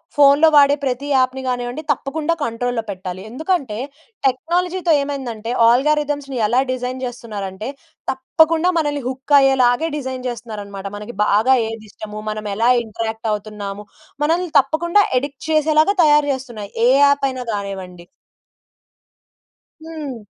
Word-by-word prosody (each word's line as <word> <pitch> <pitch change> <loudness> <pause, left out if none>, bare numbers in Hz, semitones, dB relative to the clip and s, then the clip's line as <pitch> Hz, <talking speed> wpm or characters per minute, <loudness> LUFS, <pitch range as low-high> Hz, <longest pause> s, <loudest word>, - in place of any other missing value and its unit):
ఫోన్‌లో 285 +2 +6
వాడే 285 -1 +6
ప్రతి 265 +1 -2
యాప్‍ని 260 -1 +2
గానివ్వండి 245 +3 -3
తప్పకుండా 295 +4 -1
కంట్రోల్‌లో 235 -1 -2
పెట్టాలి. 185 -1 -6
ఎందుకంటే, 270 - -2 0.5
టెక్నాలజీతో 345 +6 0
ఏమైందంటే 245 -6 -4 0.2
అల్గారిథమ్స్‌ని 285 +2 +1
ఎలా 240 +4 +2
డిజైన్ 255 0 -3
చేస్తున్నారంటే, 215 -4 -6 0.4
తప్పకుండా 320 +6 +2
మనల్ని 290 -3 0
హుక్ 265 +3 -4
అయ్యేలాగే 265 +2 +3
డిజైన్ 260 -2 -5
చేస్తున్నారనమాట. 210 -4 -7
మనకి 210 +2 -8
బాగా 220 +6 +4
ఏదిష్టము, 215 -1 -8
మనమేలా 215 +2 -1
ఇంటరాక్ట్ 220 0 -4
అవుతున్నాము, 205 -1 -6 0.4
మనల్ని 335 +4 +1
తప్పకుండా 340 +8 +2 0.2
ఎడిక్ట్ 280 +1 -7
చేసేలాగా 310 +4 +3
తయారు 295 -1 +4
చేస్తున్నాయి. 240 -6 -7 0.2
ఏ - - +5
యాప్ 280 0 +4
అయినా 255 -1 -6
కానివ్వండి. 190 -3 -6 1.8
హ్మ్. 310 -5 -6
255 Hz, 110 wpm, -19 LUFS, 220-290 Hz, 1.8 s, ఫోన్‌లో